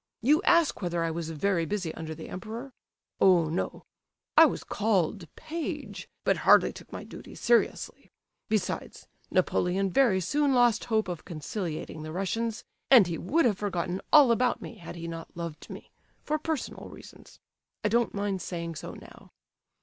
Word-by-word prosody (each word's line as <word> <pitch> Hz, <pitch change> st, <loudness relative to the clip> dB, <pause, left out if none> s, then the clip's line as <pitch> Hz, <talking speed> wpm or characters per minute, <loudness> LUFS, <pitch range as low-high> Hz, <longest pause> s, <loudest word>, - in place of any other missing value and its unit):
You 300 Hz, +7 st, +4 dB
ask 340 Hz, -, +3 dB
whether 175 Hz, -2 st, -1 dB
I 165 Hz, -, -1 dB
was 165 Hz, 0 st, -4 dB
very 170 Hz, +2 st, 0 dB
busy 180 Hz, -2 st, -3 dB
under 160 Hz, -1 st, -6 dB
the -, -, -9 dB
Emperor? 225 Hz, +8 st, -7 dB, 0.5 s
Oh 175 Hz, -4 st, +5 dB
no! 165 Hz, -, -3 dB, 0.5 s
I -, -, +9 dB
was -, -, -4 dB
called 195 Hz, -4 st, 0 dB
'page,' 325 Hz, 0 st, -5 dB
but -, -, +2 dB
hardly -, -, +5 dB
took -, -, -13 dB
my -, -, -6 dB
duty -, -, -11 dB
seriously. 235 Hz, 0 st, 0 dB, 0.4 s
Besides, 215 Hz, -4 st, -2 dB, 0.2 s
Napoleon 190 Hz, +2 st, +1 dB
very 230 Hz, -5 st, +4 dB
soon 280 Hz, -, +1 dB
lost 240 Hz, -3 st, +3 dB
hope 220 Hz, -3 st, +1 dB
of 175 Hz, -3 st, -5 dB
conciliating 160 Hz, -1 st, -5 dB
the 155 Hz, 0 st, -6 dB
Russians, 215 Hz, +6 st, -2 dB, 0.3 s
and 245 Hz, -7 st, +8 dB
he 170 Hz, -2 st, -4 dB
would 290 Hz, -, +2 dB
have 210 Hz, -5 st, +2 dB
forgotten 185 Hz, -2 st, -2 dB
all 290 Hz, -5 st, +8 dB
about 245 Hz, +1 st, +2 dB
me -, -, -9 dB
had 170 Hz, 0 st, -9 dB
he 170 Hz, -1 st, -6 dB
not 165 Hz, 0 st, -8 dB
loved 170 Hz, -2 st, -6 dB
me—for 305 Hz, +1 st, -7 dB
personal 315 Hz, -2 st, -4 dB
reasons—I -, -, -10 dB
don't 235 Hz, 0 st, +1 dB
mind 200 Hz, -2 st, -2 dB
saying 170 Hz, -2 st, -5 dB
so -, -, -7 dB
now. -, -, -14 dB
195 Hz, 155 wpm, -28 LUFS, 170-235 Hz, 0.5 s, I